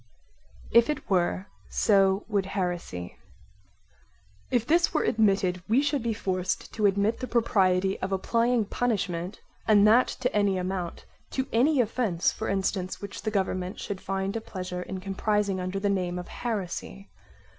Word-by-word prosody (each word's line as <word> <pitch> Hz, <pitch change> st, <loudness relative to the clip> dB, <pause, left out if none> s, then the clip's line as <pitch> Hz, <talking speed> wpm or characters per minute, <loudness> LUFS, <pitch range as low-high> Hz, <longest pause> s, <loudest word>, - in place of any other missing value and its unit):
If 235 Hz, +2 st, +6 dB
it 300 Hz, -, -3 dB
were, 185 Hz, +1 st, +1 dB, 0.2 s
so 195 Hz, -1 st, +3 dB
would 200 Hz, -3 st, 0 dB
heresy 175 Hz, -, -4 dB, 1.3 s
If 240 Hz, -3 st, +1 dB
this 335 Hz, +3 st, +3 dB
were -, -, +3 dB
admitted 195 Hz, -4 st, +2 dB
we 250 Hz, +6 st, +4 dB
should 285 Hz, -2 st, 0 dB
be 225 Hz, -1 st, -1 dB
forced 185 Hz, -2 st, -2 dB
to 210 Hz, -2 st, +3 dB
admit 200 Hz, +3 st, +1 dB
the 255 Hz, -, -4 dB
propriety 195 Hz, -5 st, +2 dB
of 190 Hz, -, -3 dB
applying 230 Hz, +4 st, +1 dB
punishment, 195 Hz, -5 st, -2 dB, 0.3 s
and 210 Hz, -2 st, +6 dB
that 230 Hz, +4 st, +6 dB
to 250 Hz, -2 st, 0 dB
any 200 Hz, -2 st, +2 dB
amount, 180 Hz, -1 st, -4 dB, 0.3 s
to 265 Hz, -, 0 dB
any 270 Hz, +5 st, +4 dB
offence 215 Hz, -6 st, +1 dB
for 220 Hz, -, -4 dB
instance 190 Hz, -1 st, -1 dB
which 200 Hz, -1 st, -7 dB
the 215 Hz, -, -1 dB
government 190 Hz, -2 st, -2 dB
should 195 Hz, -2 st, -5 dB
find 195 Hz, +1 st, -2 dB
a 225 Hz, -, -2 dB
pleasure 180 Hz, -4 st, -5 dB
in 185 Hz, +1 st, -6 dB
comprising 200 Hz, 0 st, 0 dB
under 185 Hz, +2 st, -3 dB
the 205 Hz, -, 0 dB
name 180 Hz, -3 st, 0 dB
of 180 Hz, -, -6 dB
heresy. 195 Hz, -3 st, -4 dB
195 Hz, 155 wpm, -27 LUFS, 185-225 Hz, 1.3 s, If